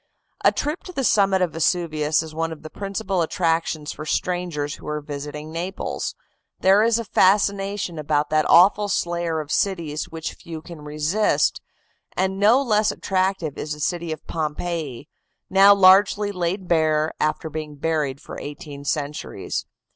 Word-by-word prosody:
A - - +6
trip 300 +4 -3
to 365 - -7
the 275 -6 -2
summit 195 -5 +3
of 175 - -1
Vesuvius 155 -2 +1
is 160 -1 -9
one 165 +1 -2
of 160 - -9
the 155 - -9
principal 195 -2 -2
attractions 165 -2 0
for - - -7
strangers 155 -2 -2
who - - -11
are 150 0 -2
visiting 150 +1 -7
Naples. 175 +4 -4 0.4
There 195 +2 +5
is 230 0 +3
a 230 - -3
fascination 195 -2 +2
about 150 0 0
that 155 0 +2
awful 200 +4 +6
slayer 170 -3 -1
of 150 -1 -6
cities 170 -6 -1
which 160 0 -5
few 160 -2 -9
can 170 -3 -10
resist, 150 +8 +1 0.6
and 190 +1 0
no 230 +7 +5
less 215 -4 +2
attractive 185 -5 -1
is 150 - -3
the 150 - -9
city 170 +1 -2
of 155 - -6
Pompeii, 155 -3 -4 0.4
now 195 +1 +7
largely 200 +2 +5
laid 185 0 -2
bare 155 -2 +2
after 155 +1 0
being 155 -1 -5
buried 145 -3 -1
for - - -9
eighteen 145 -1 -8
centuries. 145 +1 -3
165 Hz, 155 wpm, -23 LUFS, 150-195 Hz, 0.6 s, now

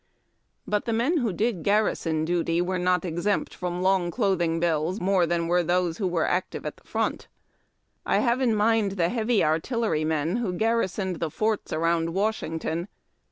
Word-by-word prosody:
But 210 -1 -1
the 230 - -1
men 250 +10 +1
who 240 -7 0
did 205 0 -1
garrison 165 -6 +1
duty 170 0 0
were 180 +1 0
not 180 0 +1
exempt 175 +4 -1
from 180 0 -3
long 190 -2 +2
clothing 175 -5 0
bills 165 +3 0
more 185 -2 +2
than 170 0 0
were 175 +1 +3
those 175 0 0
who 195 - 0
were 170 -3 0
active 180 +1 -2
at - - -5
the - - -24
front. - - -2 0.8
I - - +1
have 245 0 +1
in 235 -4 +2
mind 215 -1 +2
the 175 -3 +1
heavy 230 0 +1
artillerymen 160 - 0
who 225 -7 -2
orarrisoned 195 -5 0
the 165 - -1
forts 215 +6 -1
around 165 +1 0
Washington. 175 -4 -2
180 Hz, 165 wpm, -26 LUFS, 165-215 Hz, 0.8 s, were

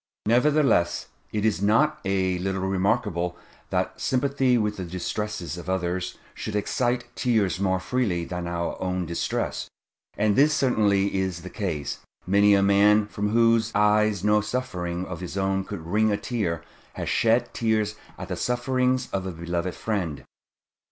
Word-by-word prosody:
Nevertheless 125 - +3 0.2
it 105 0 -1
is 105 -3 +1
not 150 +10 +3
a 95 -2 +1
little 95 +1 -2
remarkable 95 -2 0 0.3
that - - -2
sympathy 130 -1 +2
with 105 -2 -1
the 95 - -4
distresses 90 -1 -4
of 85 +1 -8
others 90 -1 -2 0.2
should 110 - -5
excite 120 +4 0
tears 110 -7 +1
more 95 -1 +1
freely 95 -7 -1
than 90 0 -4
our 85 0 -3
own 90 -1 -1
distress; 85 +1 -2 0.5
and 105 0 +2
this 150 +4 +5
certainly 100 -8 +2
is 95 -3 -2
the 90 - -8
case. 80 -9 -3 0.3
Many 100 +2 +5
a 100 - +3
man, 100 +2 +5
from 105 0 -2
whose 115 0 +3
eyes 105 -2 +3
no 105 0 +4
suffering 90 -7 -3
of 85 -3 -6
his 90 +1 -6
own 95 0 0
could 95 -6 -7
wring 105 +5 +2
a 100 - +1
tear, 85 -10 -2 0.3
has - - -5
shed 115 +1 +2
tears 110 -2 +1 0.2
at - - -7
the - - -2
sufferings 125 +1 0
of 95 -1 -2
a - - -3
beloved 85 +1 -3
friend. 95 -9 -3
100 Hz, 155 wpm, -25 LUFS, 90-115 Hz, 0.5 s, this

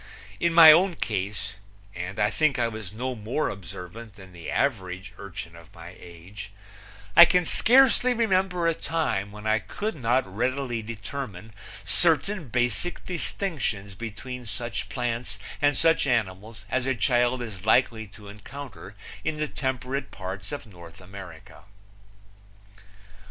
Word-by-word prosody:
In 170 - +2
my 165 -2 +11
own 175 +3 +4
case 105 -6 -3 0.4
and 90 +4 -5
I 105 0 +3
think 155 -4 +2
I 120 -1 +2
was 110 -4 -7
no 125 +4 -3
more 120 +6 -2
observant 95 +4 -9
than 95 -2 -14
the 85 -2 -8
average 95 -6 -1
urchin 85 -4 -8
of 85 -1 -16
my 85 +2 -11
age 90 +4 -10 0.7
I - - +12
can 180 0 +2
scarcely 255 +5 +5
remember 190 -6 +1
a 165 - +3
time 150 -13 -2
when 105 +1 -10
I 110 0 +3
could 215 - -4
not 125 0 +1
readily 120 +4 -2
determine 110 -1 -7 0.3
certain 170 +1 +3
basic 120 - 0
distinctions 155 - -3
between 120 +4 -7
such 115 +3 -3
plants 120 -3 -3 0.2
and 145 0 +3
such 165 -3 +3
animals 110 -2 -2
as 130 +2 -1
a 135 - +1
child 120 0 +2
is 105 -3 -8
likely 110 -1 +3
to 105 +1 -14
encounter 105 0 -10 0.3
in 155 0 -2
the 150 0 -1
temperate 130 0 -3
parts 95 +1 -7
of 145 - -5
North 85 -5 -13
America. 95 -3 -12
115 Hz, 140 wpm, -26 LUFS, 100-140 Hz, 0.7 s, I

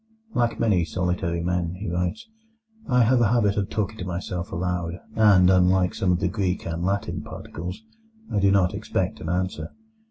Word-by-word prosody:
"Like 120 -1 0
many 105 -7 +3
solitary 85 0 -1
men," 90 -1 -1
he 100 +4 -6
writes, 90 - -2 0.6
"I 125 -1 +5
have 120 +2 +3
a 115 - +4
habit 105 -3 +2
of 100 -2 -1
talking 105 0 -2
to - - -3
myself 90 0 -4
aloud; 90 0 -2 0.2
and, 100 -5 +6
unlike 90 0 +3
some 95 - +1
of 90 - +2
the - - +1
Greek 95 -1 -1
and 85 +1 -3
Latin 100 +2 -1
particles, 90 +7 -7 0.5
I 105 - +2
do 100 0 +4
not 95 -2 +3
expect - - -2
an 80 - -4
answer. 90 +1 -2
90 Hz, 180 wpm, -24 LUFS, 90-100 Hz, 0.6 s, and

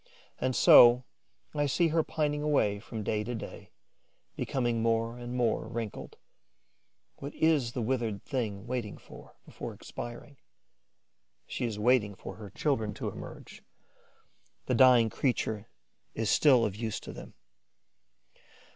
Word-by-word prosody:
And 130 -1 0
so 120 +1 +8 0.5
I 145 0 +1
see 165 +4 +2
her 160 +1 +2
pining 150 -1 -1
away 140 -9 +1
from 110 0 -7
day 105 +1 -1
to 120 +3 -4
day, 110 - -8 0.7
becoming 120 -3 -1
more 115 +1 0
and 120 0 -6
more 115 -3 0
wrinkled. 115 -2 -6 1.0
What 140 - -8
is 150 -7 +2
the 125 - -2
withered 115 -4 -2
thing 110 -7 -3
waiting 120 -4 -4
for, - - -14
before - - -8
expiring? 120 +4 -9 1.1
She - - -3
is 110 -3 -3
waiting 105 -2 +2
for - - -9
her 105 -2 -9
children 110 -2 -1
to - - -3
emerge; - - -10 1.0
the - - 0
dying 125 -4 +6
creature 110 -5 -1 0.5
is 110 -3 0
still 130 -6 +5
of 100 - -3
use 110 0 -3
to - - -8
them. - - -11
120 Hz, 135 wpm, -30 LUFS, 110-130 Hz, 1.1 s, so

